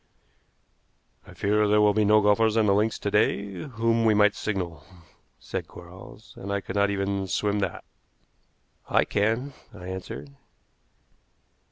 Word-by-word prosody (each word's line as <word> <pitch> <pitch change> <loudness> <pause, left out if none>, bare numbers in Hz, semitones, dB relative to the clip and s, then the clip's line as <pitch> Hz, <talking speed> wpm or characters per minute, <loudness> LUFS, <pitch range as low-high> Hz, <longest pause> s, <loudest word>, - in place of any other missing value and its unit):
"I - - -13
fear 105 +1 +1
there 105 +1 +3
will 105 -1 +4
be 105 0 +2
no 105 +1 +5
golfers 105 +2 +3
on 110 - +4
the 100 - +3
links 105 +2 +1
to 100 - -3
day 100 -1 +1
to 90 - -7
whom 115 -2 0
we 110 -1 +4
might 105 0 +4
signal," 90 -7 -4 0.6
said - - -5
Quarles; - - -13
"and 100 - -6
I 100 - 0
could 95 0 -8
not 100 0 +3
even 100 -1 -2
swim 105 +3 0
that." 100 - -3 1.1
"I - - +3
can," 115 +7 -1 0.2
I 90 +1 -9
answered. 75 -7 -7
105 Hz, 155 wpm, -26 LUFS, 100-110 Hz, 1.1 s, no